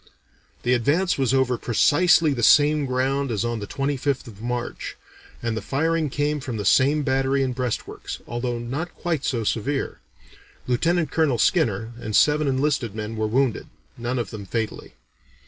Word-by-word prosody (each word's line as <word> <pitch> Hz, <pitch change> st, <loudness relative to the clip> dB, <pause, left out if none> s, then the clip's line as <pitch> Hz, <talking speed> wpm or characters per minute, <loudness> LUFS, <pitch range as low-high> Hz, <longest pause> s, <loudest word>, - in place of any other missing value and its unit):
"The 125 Hz, -, +2 dB
advance 145 Hz, +9 st, +1 dB
was 130 Hz, -3 st, +2 dB
over 130 Hz, -2 st, +2 dB
precisely 155 Hz, +5 st, +4 dB
the 120 Hz, -, -3 dB
same 145 Hz, +3 st, +5 dB
ground 135 Hz, +2 st, 0 dB
as 110 Hz, -1 st, -1 dB
on 120 Hz, -1 st, -2 dB
the 100 Hz, -, -6 dB
25th 140 Hz, 0 st, -1 dB
of 105 Hz, -4 st, -12 dB
March, 120 Hz, 0 st, -4 dB, 0.5 s
and 115 Hz, -1 st, -1 dB
the 110 Hz, -, -3 dB
firing 160 Hz, +6 st, 0 dB
came 145 Hz, +2 st, -1 dB
from 130 Hz, -4 st, -5 dB
the 105 Hz, -, -4 dB
same 140 Hz, +8 st, +4 dB
battery 135 Hz, 0 st, +1 dB
and 130 Hz, -1 st, -1 dB
breastworks, 125 Hz, -2 st, -4 dB
although 120 Hz, +1 st, -3 dB
not 135 Hz, +9 st, -4 dB
quite 160 Hz, -5 st, -2 dB
so 120 Hz, -3 st, -1 dB
severe. 135 Hz, +6 st, -2 dB, 0.7 s
Lieutenant 160 Hz, +5 st, +1 dB
Colonel 155 Hz, -7 st, +2 dB
Skinner 115 Hz, -, +1 dB
and 110 Hz, -3 st, -4 dB
seven 150 Hz, 0 st, +4 dB
enlisted 135 Hz, -5 st, 0 dB
men 110 Hz, +1 st, -4 dB
were 110 Hz, 0 st, -1 dB
wounded 125 Hz, +2 st, 0 dB, 0.3 s
none 120 Hz, +2 st, -3 dB
of 120 Hz, -, -3 dB
them 105 Hz, -3 st, -8 dB
fatally. 110 Hz, +1 st, -4 dB
130 Hz, 165 wpm, -23 LUFS, 120-145 Hz, 0.7 s, same